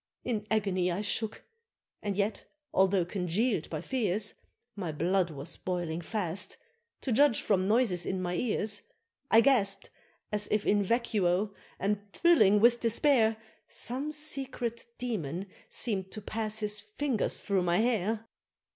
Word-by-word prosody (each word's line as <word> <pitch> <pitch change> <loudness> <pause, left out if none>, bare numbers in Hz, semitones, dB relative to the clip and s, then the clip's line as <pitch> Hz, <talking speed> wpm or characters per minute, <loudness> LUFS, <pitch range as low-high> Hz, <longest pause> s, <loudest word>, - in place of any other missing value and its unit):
In 215 -4 -2
agony 195 -4 +1
I 180 +4 -1
shook, 215 +1 -2 0.6
and 200 -2 -2
yet, 205 +1 -1 0.3
although 190 -1 +3
congealed 185 +2 0
by 155 -2 -3
fears, 210 -5 0 0.4
My 180 -6 -3
blood 175 +4 +1
was 150 +1 -5
boiling 175 -2 -2
fast, 190 -1 -3 0.4
to 260 - -2
judge 265 0 +5
from 190 -2 +1
noises 210 -5 +2
in 190 - -1
my 180 -1 -2
ears; 210 +1 0 0.5
I 225 - +7
gasp'd 230 -7 +2 0.4
as 210 0 0
if 210 -1 +1
in 205 0 +3
vacuo, 200 -3 +1 0.2
and 200 +1 0
thrilling 215 - +5
with 235 +2 +5
despair, 230 -1 +3 0.3
Some 270 +5 -3
secret 270 -6 -3
Demon 190 - -3 0.2
seem'd 190 -5 -1
to 215 - -5
pass 220 0 -2
his 210 0 -1
fingers 215 +3 -1
through 200 -2 +1
my 175 0 +2
hair. 225 -1 +1
210 Hz, 140 wpm, -30 LUFS, 185-230 Hz, 0.6 s, I